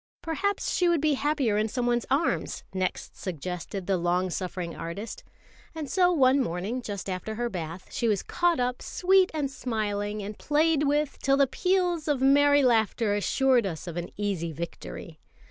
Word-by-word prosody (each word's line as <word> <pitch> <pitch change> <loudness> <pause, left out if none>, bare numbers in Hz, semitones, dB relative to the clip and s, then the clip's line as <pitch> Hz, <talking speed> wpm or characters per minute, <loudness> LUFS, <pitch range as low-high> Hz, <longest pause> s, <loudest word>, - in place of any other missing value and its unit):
] - - -73
"Perhaps 380 +5 -1
she 355 -1 +3
would 340 -2 +3
be 305 0 +2
happier 275 -7 +1
in 215 - +1
someone's 240 0 0
arms," 280 +6 0
next 185 -1 -3
suggested 180 +2 -5
the 195 0 +1
long 175 +1 0
suffering 180 -2 -4
artist; 180 +7 -6 0.5
and 310 -2 -4
so 360 +4 +3
one 270 -4 +4
morning, 200 +5 -2
just 200 -5 -5
after 190 +3 -4
her 240 +1 -1
bath, 170 0 -6
she 240 -4 0
was 205 -3 +1
caught 350 -3 +1
up, 250 0 -1
sweet 375 0 +3
and 290 -4 -2
smiling, 210 -5 -2
and 210 +1 -7
played 300 0 +2
with 295 0 0
till 275 0 +2
the 280 - +5
peals 355 +1 0
of 290 -3 +1
merry 285 +2 +5
laughter 225 -3 +2
assured 245 +2 +2
us 165 -3 -5
of 170 -2 -6
an 175 0 -4
easy 195 -5 -2
victory. 155 - -7
240 Hz, 175 wpm, -27 LUFS, 190-290 Hz, 0.5 s, the